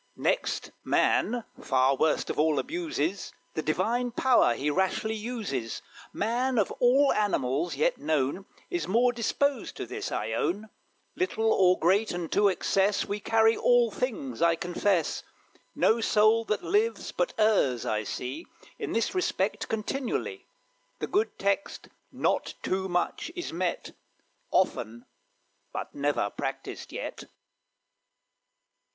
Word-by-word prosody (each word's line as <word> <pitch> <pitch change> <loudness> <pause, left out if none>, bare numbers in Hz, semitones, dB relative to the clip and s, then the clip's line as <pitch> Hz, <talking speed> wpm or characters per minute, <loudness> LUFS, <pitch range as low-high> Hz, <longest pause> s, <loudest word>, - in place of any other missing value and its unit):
Next - - -1
man 240 0 +2 0.2
far 130 +1 +3
worst 155 +3 +1
of - - -4
all 155 -1 +3
abuses 265 - -2 0.2
The 155 - -2
power 185 +11 0
Divine 240 - +3
he 150 +2 0
rashly 190 +5 0
uses. 210 - -4 0.3
Man, 245 +4 0
of 210 - +2
all 265 +3 +5
animals 160 -6 0
yet 145 - +1
known, 150 +5 -1 0.2
Is 170 -2 -2
more 240 +5 +3
disposed 250 +2 -1
to - - -4
this, - - -5
I 110 - -2
own; 200 - -1 0.5
Little 225 -12 +1
or 185 -1 +4
great, 190 +3 +2
unto 175 +4 +2
excess 195 +1 +1
We 205 +1 -3
carry 225 +1 +3
all 245 -2 +3
things, 170 - -3
I 170 0 +4
confess; 175 +1 0 0.5
No 230 +1 +3
soul 220 +1 +4
that 210 -1 -1
lives 430 +4 0
but - - -1
errs, 200 - +3
I 105 0 0
see, 130 - -5 0.3
In - - -3
this 230 - 0
respect 370 -1 -1
continually, 270 - -3 0.5
The - - -3
good 415 +4 0
text, 200 +8 -1 0.2
"Not - - 0
too 190 0 -1
much," 180 - -1
is 350 - -5
met 175 +1 -2 0.6
Often, 115 +2 0 0.7
but - - -5
never 140 -8 0
practised - - -5
yet. - - -6
205 Hz, 130 wpm, -28 LUFS, 160-235 Hz, 0.7 s, all